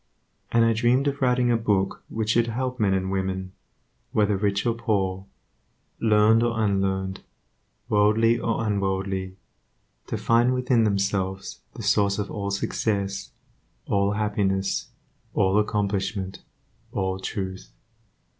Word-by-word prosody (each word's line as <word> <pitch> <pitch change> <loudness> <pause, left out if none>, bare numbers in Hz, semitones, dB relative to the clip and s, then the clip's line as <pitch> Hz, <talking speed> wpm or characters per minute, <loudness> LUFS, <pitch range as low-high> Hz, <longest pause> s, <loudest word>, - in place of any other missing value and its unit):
And 115 0 +4
I 115 - +3
dreamed 125 +4 +2
of 140 0 -2
writing 125 -1 +3
a - - +4
book 100 -4 0
which 110 -1 -1
should 120 +1 +3
help 125 +2 -3
men 100 -3 +3
and 95 0 -1
women, 95 -1 -2 0.6
whether 105 -1 +2
rich 100 0 0
or 120 - +2
poor, 100 -4 -1 0.7
learned 110 0 +4
or 115 -1 0
unlearned, 95 -2 0 0.7
worldly 110 +3 +3
or 115 0 -1
unworldly, 95 -2 -1 0.7
to - - -2
find 120 +2 +3
within 125 -3 +2
themselves 100 -2 -1 0.2
the - - -7
source 100 -1 +2
of 105 -1 -3
all 100 -1 -3
success, 100 -1 -2 0.6
all 100 0 +1
happiness, 100 -2 0 0.5
all 95 +2 +3
accomplishment, 100 -2 -1 0.5
all 95 -1 -2
truth. 95 0 -5
105 Hz, 125 wpm, -25 LUFS, 95-115 Hz, 0.7 s, And